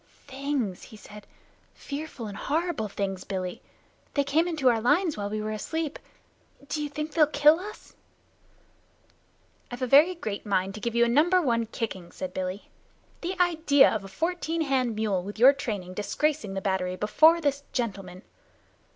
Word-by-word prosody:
"Things!" 265 -8 -3
he 220 - -12
said. 210 0 -13 0.5
"Fearful 280 -4 -6
and 205 -2 -7
horrible, 305 -7 -2 0.4
Billy! 190 +4 -4 0.5
They 285 - +3
came 315 +5 +1
into 315 -6 0
our 230 -3 +4
lines 305 - +2
while 205 -1 -4
we 215 +1 -3
were 215 - -3
asleep. 310 +8 -3 0.7
D'you 300 0 -3
think 300 +2 -5
they'll 305 -1 +4
kill 300 +2 +5
us?" 415 +3 -10 1.8
"I've 245 +1 -6
a - - +3
very 295 +8 +6
great 215 -11 -5
mind 195 -2 0
to 215 - -8
give 235 +1 -3
you 235 0 +5
a - - +1
number 315 +10 +4
one 235 -8 0
kicking," 195 -6 -5
said 185 -1 -6
Billy. 185 +2 -5 0.5
"The 365 +1 -4
idea 320 -5 +4
of 215 -3 -3
a - - -8
fourteen 330 - -2
hand 260 -6 0
mule 210 -4 0
with 205 +4 -8
your 255 +5 +7
training 205 -9 -5
disgracing 210 +3 -1
the 195 - -2
battery 190 -2 -1
before 315 - +4
this 285 -3 0
gentleman!" 195 -6 -4
250 Hz, 160 wpm, -27 LUFS, 205-305 Hz, 1.8 s, your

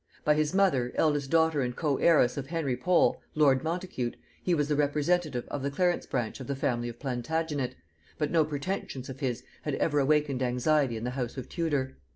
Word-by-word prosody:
By 150 - +5
his 150 0 +1
mother, 180 -11 +2
eldest 145 -3 +1
daughter 160 -2 +3
and 125 -1 -2
coheiress 150 -3 +3
of 135 -1 -4
Henry 155 -5 -1
Pole 170 +8 +2
lord 140 -4 +4
Montacute, 165 -7 -3 0.3
he 180 - +1
was 145 -2 +1
the 150 - +1
representative 150 -1 +1
of 145 - -3
the 140 - -1
Clarence 175 +5 0
branch 120 -2 -2
of 130 - -7
the 140 - -2
family 120 -3 -1
of 120 - -9
Plantagenet; 140 +2 -2 0.4
but 150 -1 -1
no 165 -2 +4
pretensions 145 -3 -4
of 135 0 -7
his 125 -4 -2 0.2
had 150 -2 -2
ever 150 -2 +1
awakened 145 -2 +2
anxiety 125 0 +1
in 110 - -6
the 125 - -2
house 125 0 -4
of 130 - -6
Tudor. 145 -6 -1
145 Hz, 195 wpm, -29 LUFS, 130-160 Hz, 0.4 s, By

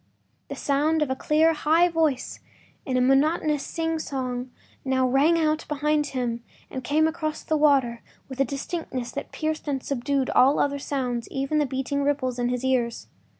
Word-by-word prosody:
The - - -6
sound 300 +2 +1
of 275 - -3
a - - 0
clear, 315 +4 +3
high 320 +3 +3
voice 320 -6 -1 0.5
in 255 -1 0
a - - +3
monotonous 295 +3 +2
singsong 270 -6 -3 0.3
now 260 -1 +1
rang 285 +6 +3
out 310 -1 +1
behind 300 0 0
him 240 -3 -3 0.3
and 260 - -5
came 305 +5 +2
across 315 -1 -3
the 315 - 0
water 275 -6 +3 0.3
with 265 -1 -9
a - - +5
distinctness 275 -1 -4
that - - -6
pierced 310 -1 -3
and 270 -3 -2
subdued 275 0 -1
all 270 +3 +5
other 285 0 +1
sounds, 250 -4 -3
even 275 +3 -1
the 295 - +1
beating 265 +2 -2
of 280 - 0
the - - +1
ripples 260 -4 -1
in 245 0 +1
his 250 +1 -2
ears. 245 -3 -1
280 Hz, 180 wpm, -25 LUFS, 260-305 Hz, 0.5 s, a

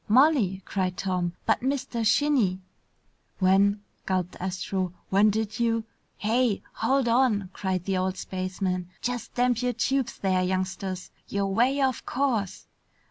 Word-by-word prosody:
"Molly!" 220 - +4
cried 185 -2 -1
Tom. 180 -2 -1
"But, 220 - +2
Mr. 255 -3 -1
Shinny 225 -5 +3 0.4
" - - -43 0.3
"When 200 +2 +3
" - - -41
gulped 185 -2 -1
Astro, 185 0 -2 0.2
"when 200 +2 +5
did 220 +1 -2
you 230 -1 +1 0.2
" - - -43
"Hey! 225 0 +1
Hold 260 +2 +1
on!" 230 -6 +2
cried 190 -3 -2
the 195 -1 0
old 185 0 -1
spaceman. 185 -1 -3
"Just 245 -2 -3
damp 245 -1 +2
your 250 0 0
tubes 260 +1 0
there, 185 -2 +1
youngsters! 185 0 -2 0.2
You're 200 0 -1
way 245 +8 +2
off 265 -3 +1
course. 245 -8 -1
200 Hz, 145 wpm, -27 LUFS, 185-245 Hz, 0.4 s, when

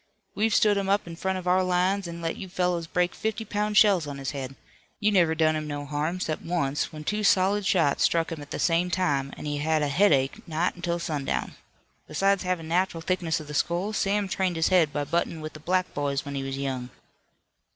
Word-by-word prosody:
We've 215 +2 +1
stood 210 -2 +4
him 195 -1 -1
up 200 +1 +2
in 170 -1 -8
front 190 +2 -2
of 180 -1 -6
our 185 +1 +4
lines, 185 +1 +1
and 170 0 -7
let 165 - -1
you 190 - -8
fellows 180 -2 -1
break 180 +1 0
fifty 220 +1 -3
pound 210 +1 -1
shells 195 -8 +5
on 145 -1 -5
his 135 -1 -4
head. 135 -2 -6 0.4
You 210 0 +2
never 170 -5 +3
done 155 -1 +3
him 155 0 -3
no 145 -1 -4
harm, 150 +5 -2
'cept 155 -4 -2
once 150 -5 -1
when 155 -1 -8
two 210 +6 -1
solid 195 +1 +3
shot 165 -7 +2
struck 165 -1 +2
him 160 -2 -5
at 145 - -10
the - - -4
same 170 +1 +2
time 145 -7 0
an' - - -8
he 145 -1 -2
had 155 +1 +1
a 145 - 0
headache 140 -5 +3
nigh 165 +2 0
until 175 -1 -2
sundown. 150 -5 -2 0.5
Besides 195 +5 +2
havin' 180 -3 -2
natural 175 0 0
thickness 170 -2 0
of 155 - -8
the 150 - -8
skull 175 +7 0
Sam 205 -1 +1
trained 190 -2 -1
his 165 0 +2
head 175 -5 +4
by 145 - -1
buttin' 170 +2 -1
with 155 0 -7
the 155 - -10
black 185 +3 0
boys 140 -1 -1
when 140 - -5
he 140 - -2
was 135 0 -4
young." 130 -3 -3
170 Hz, 225 wpm, -26 LUFS, 150-185 Hz, 0.5 s, shells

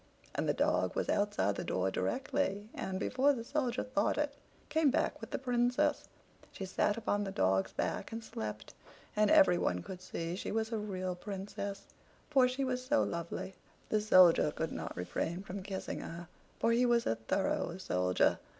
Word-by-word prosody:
And - - -1
the - - +4
dog - - +1
was - - -1
outside 205 - +1
the - - -2
door 95 +1 0
directly, 255 - -1
and, 190 0 -3
before 265 +7 +3
the 235 -4 -4
Soldier 255 -2 -1
thought 215 -5 0
it, 295 -1 0 0.3
came 315 -1 +3
back 270 - 0
with - - -7
the - - -2
Princess. 250 +3 +1 0.4
She 190 - -6
sat 205 +3 +1
upon 205 -2 0
the 200 - -3
dogs 95 - +1
back - - -2
and 225 0 -5
slept; 105 - -6 0.4
and 210 0 +4
everyone 180 - +4
could 185 -1 -8
see 170 -1 -4
she 190 - -4
was 220 +1 -1
a 225 - -1
real 185 -3 -3
Princess, 200 +1 -5 0.5
for 265 -3 +6
she 255 +2 -2
was 255 -1 -1
so 285 +3 +3
lovely. 170 +2 -4 0.4
The 215 - +2
Soldier 185 -7 +6
could 160 +2 -3
not - - -5
refrain 170 - -2
from 195 0 -6
kissing 190 0 -4
her, 170 +1 -7 0.3
for 230 - +2
he 235 +2 +4
was 240 -1 +3
a - - +2
thorough 170 - -1
soldier. 90 - +2
205 Hz, 175 wpm, -33 LUFS, 175-250 Hz, 0.5 s, for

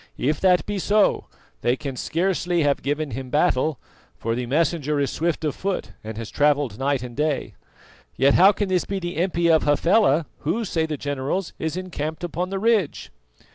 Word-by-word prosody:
If 150 +3 0
that 180 -2 +4
be 205 -1 -3
so, 205 +3 +2 0.3
they 120 +1 +2
can 135 -1 -6
scarcely 175 +2 0
have 145 -1 +1
given 145 +1 -2
him 130 +2 -6
battle, 150 -1 +2 0.4
for 115 - -2
the 120 +1 -3
messenger 150 +1 +1
is 140 -2 0
swift 165 -1 -1
of 150 - 0
foot 195 0 -3
and 110 0 -7
has 115 -1 -6
travelled 145 -6 +1
night 135 -2 0
and 120 -1 -8
day. 150 0 -1 0.6
Yet 135 +2 +4
how 190 +3 +7
can 205 0 -2
this 185 -2 +2
be 200 - -3
the 175 -1 -4
impi 170 -1 +1
of 160 - +5
Hafela, 165 +1 +3
who, 200 +10 -1
say 160 -4 -1
the 155 -2 -3
generals, 145 +7 -3
is 160 +2 -2
encamped 160 -3 -4
upon 175 +2 -2
the 195 - -3
ridge?" 215 -5 0
155 Hz, 185 wpm, -23 LUFS, 140-180 Hz, 0.6 s, how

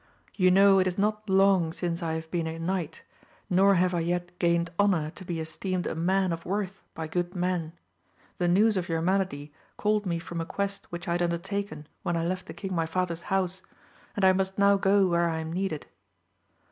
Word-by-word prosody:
You 185 -2 +3
know 195 +1 +6
it 185 - +3
is 180 - -2
not 210 +1 0
long 190 -3 +4
since 170 0 -3
I 165 -1 -1
have 160 0 -5
been 170 -2 -1
a 160 0 -4
knight, 175 -1 -3 0.5
nor 195 +2 +5
have 180 0 +2
I 175 - +1
yet 175 +1 -2
gained 170 -1 +2
honour 180 -7 +2
to 185 - -11
be 175 -2 -4
esteemed 175 +3 -3
a - - -2
man 185 +2 +1
of 165 0 -6
worth 195 0 -3
by 160 -1 -4
good 175 +2 -2
men. 175 -3 -1 0.7
The 175 - +2
news 205 +4 +4
of 180 -1 -2
your 165 0 0
malady 175 -6 -1 0.2
called 210 -1 +1
me 170 -1 0
from 170 0 -5
a - - -3
quest 200 0 -3
which 175 0 -6
I - - -1
had 175 +1 0
undertaken 175 -1 -2 0.2
when 175 -1 -1
I 165 - -1
left 185 +1 -3
the - - -7
king 195 -2 -5
my 165 -2 0
father's 170 0 -2
house, 190 -1 0 0.5
and 200 - +2
I 190 - +7
must 190 0 -1
now 200 0 +5
go 195 0 +3
where 170 -1 +2
I 160 - -2
am 160 0 -5
needed. 185 -4 -2
180 Hz, 210 wpm, -27 LUFS, 170-195 Hz, 0.7 s, I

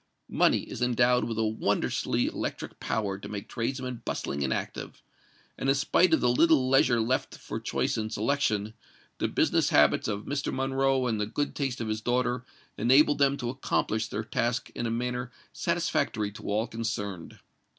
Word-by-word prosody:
Money - - +3
is - - -8
endowed 125 0 +3
with 115 -2 -4
a 110 - +1
wondrously 110 0 0
electric - - -4
power 100 -3 -2
to - - -8
make 100 -1 -6
tradesmen 125 +1 -3
bustling 70 0 -3
and 65 - -1
active; - - -4 0.6
and 135 - 0
in 135 - +4
spite 165 +5 +3
of 160 - +4
the - - +3
little 130 +2 +4
leisure 130 -2 +4
left 120 +4 -1
for - - -6
choice - - -1
and 110 0 -3
selection, 110 -3 0 0.5
the - - +1
business - - +2
habits - - +4
of 105 -1 -3
Mr. 140 0 -2
Monroe 135 0 +1
and 110 -4 0
the 105 - -1
good 145 +6 -2
taste 135 -3 -2
of 115 - -3
his 110 0 -2
daughter 125 +1 0 0.4
enabled 145 +6 +5
them 140 0 +3
to 120 -2 -3
accomplish 110 -4 -1
their 110 - -4
task 120 +2 -1
in 120 - -2
a - - -1
manner 125 +1 -2 0.2
satisfactory 105 -2 0
to 105 - -8
all 105 +2 +1
concerned. 110 -6 -4
120 Hz, 175 wpm, -28 LUFS, 110-130 Hz, 0.6 s, enabled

